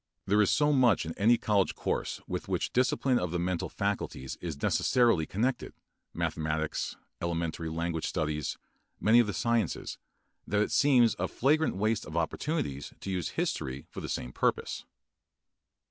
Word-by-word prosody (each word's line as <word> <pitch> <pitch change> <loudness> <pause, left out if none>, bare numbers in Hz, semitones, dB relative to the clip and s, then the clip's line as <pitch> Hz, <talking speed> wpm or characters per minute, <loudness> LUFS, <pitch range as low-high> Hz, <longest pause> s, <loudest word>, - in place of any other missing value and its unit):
There 105 +2 +4
is 105 - +3
so 150 0 +3
much 125 - +4
in 80 - -4
any 115 +4 +4
college 100 -4 +1
course - - -2
with - - -4
which - - -1
discipline 125 0 +2
of 90 - -2
the 90 - -2
mental 90 0 -1
faculties 100 -9 -3
is 80 -5 -5
necessarily 115 - +3
connected, 125 +7 -1 0.4
mathematics, 80 0 -2 0.3
elementary 85 -1 -2
language 80 0 -2
studies, 75 -3 -2 0.4
many 110 +3 +5
of 120 - +4
the 105 - -2
sciences, 115 -6 -1 0.5
that 105 +3 +2
it - - -4
seems 125 -6 +5
a - - 0
flagrant 155 +5 +2
waste 110 +2 0
of 80 +2 -5
opportunities 80 - -2
to 95 - -5
use 90 -4 -1
history 65 +1 -2
for - - -6
the - - -5
same 60 - -4
purpose. - - -1
95 Hz, 155 wpm, -30 LUFS, 80-120 Hz, 0.5 s, many